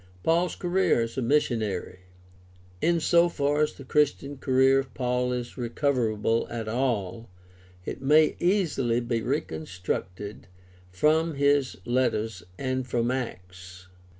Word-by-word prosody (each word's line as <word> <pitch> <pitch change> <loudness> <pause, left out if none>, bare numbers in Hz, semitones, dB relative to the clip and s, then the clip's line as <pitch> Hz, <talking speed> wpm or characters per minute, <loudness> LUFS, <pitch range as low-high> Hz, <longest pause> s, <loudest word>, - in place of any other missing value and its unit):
Paul's 170 +2 +2
career 180 -7 +1
as 115 0 -3
a 130 - -1
missionary. 115 -9 0 0.4
— 90 0 -27
In 170 -1 +2
so 170 +2 +4
far 145 -1 0
as 150 - +1
the 140 - -12
Christian 145 0 0
career 130 0 +4
of 135 -2 -5
Paul 125 -1 0
is 125 +1 -5
recoverable 115 -3 0
at 115 -2 -5
all, 115 -3 -2 0.6
it - - -5
may 150 +3 +4
easily 160 - +1
be 120 -1 -2
recon 80 -6 -3
structed 95 +2 -5 0.4
from 155 - +2
his 140 -1 +2
letters 115 -5 0 0.2
and 130 -1 -2
from 120 0 0
Acts. 95 -6 -7
125 Hz, 130 wpm, -26 LUFS, 110-145 Hz, 0.6 s, so